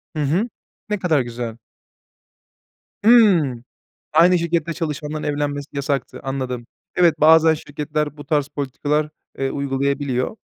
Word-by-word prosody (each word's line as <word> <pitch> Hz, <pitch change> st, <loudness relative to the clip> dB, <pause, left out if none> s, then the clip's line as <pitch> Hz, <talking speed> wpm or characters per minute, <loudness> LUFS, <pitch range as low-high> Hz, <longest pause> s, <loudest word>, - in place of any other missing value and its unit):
Hı 150 Hz, -, 0 dB
hı, 175 Hz, -, +1 dB, 0.4 s
ne 210 Hz, -1 st, -1 dB
kadar 160 Hz, -6 st, +2 dB
güzel. 120 Hz, -2 st, -5 dB, 1.5 s
Hımm. 180 Hz, -, +5 dB, 0.5 s
Aynı 175 Hz, +3 st, +5 dB
şirkette 170 Hz, -1 st, -1 dB
çalışanların 150 Hz, -2 st, -4 dB
evlenmesi 145 Hz, -1 st, -2 dB
yasaktı, 140 Hz, -1 st, -2 dB
anladım. 130 Hz, -3 st, -4 dB, 0.3 s
Evet, 170 Hz, -3 st, +4 dB
bazen 160 Hz, +1 st, +6 dB
şirketler 150 Hz, 0 st, -4 dB
bu 145 Hz, -, -10 dB
tarz 150 Hz, -4 st, +1 dB
politikalar, 145 Hz, +2 st, -2 dB, 0.3 s
eee, 135 Hz, 0 st, -1 dB
uygulayabiliyor. 140 Hz, -, -1 dB
150 Hz, 115 wpm, -21 LUFS, 135-160 Hz, 1.5 s, bazen